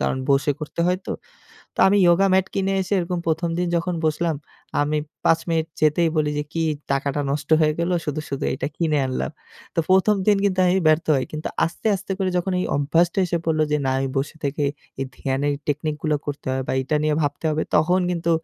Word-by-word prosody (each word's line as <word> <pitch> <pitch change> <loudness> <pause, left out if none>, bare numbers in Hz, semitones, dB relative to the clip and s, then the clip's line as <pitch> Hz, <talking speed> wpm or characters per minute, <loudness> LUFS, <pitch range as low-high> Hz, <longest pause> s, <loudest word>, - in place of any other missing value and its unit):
কারণ - - 0
বসে 140 +1 +3
করতে 150 +2 -5
হয়তো। 185 +1 -1 0.6
তো - - -22
আমি 205 +1 +4
yoga 185 +3 +5
mat 190 0 +3
কিনে 195 0 0
এসে 185 - -6
এরকম 175 0 -2
১ম 165 +1 0
দিন 180 - +1
যখন 175 +1 -1
বসলাম, 160 0 0 0.5
আমি 150 +1 0 0.3
৫ 165 0 +4
মিনিট 160 -1 +1
যেতেই 155 +2 +3
বলি 150 -1 +2
যে, - - 0
"কি 165 - -1 0.3
টাকাটা 140 +1 0
নষ্ট 145 0 -3
হয়ে 155 -1 +3
গেল। 170 +2 0
শুধু, 150 +1 -2
শুধু 140 - -3
এটা 135 - -3
কিনে 155 -3 +1
আনলাম।" 130 - -2 0.4
তো - - -5
১ম 190 +3 +5
দিন 205 -1 +5
কিন্তু 185 -2 +2
আমি 180 +2 +3
ব্যর্থ 155 +1 +3
হই। 130 - 0
কিন্তু 155 +1 -4 0.2
আস্তে, 165 - -5
আস্তে 195 +1 -5
করে 190 -2 0
যখন 185 +2 -1
এই - - -1
অভ্যাসটা 165 +6 +2
এসে 170 0 -1
পড়লো 155 -1 +2
যে, 150 - +4
না - - +2
আমি 135 - -1
বসে 145 +3 -3
থেকে 145 +1 -1 0.4
এই 135 - -1
ধ্যানের 140 +2 -1
technic 150 +1 -1
গুলো 155 -2 +1
করতে 145 0 -5
হয় 130 0 -1
বা - - 0
এটা 145 +4 0
নিয়ে 155 0 +2
ভাবতে 145 +2 -2
হবে, 155 +1 0
তখন 175 +5 +3
কিন্তু 170 -1 -1
155 Hz, 210 wpm, -23 LUFS, 145-175 Hz, 0.6 s, yoga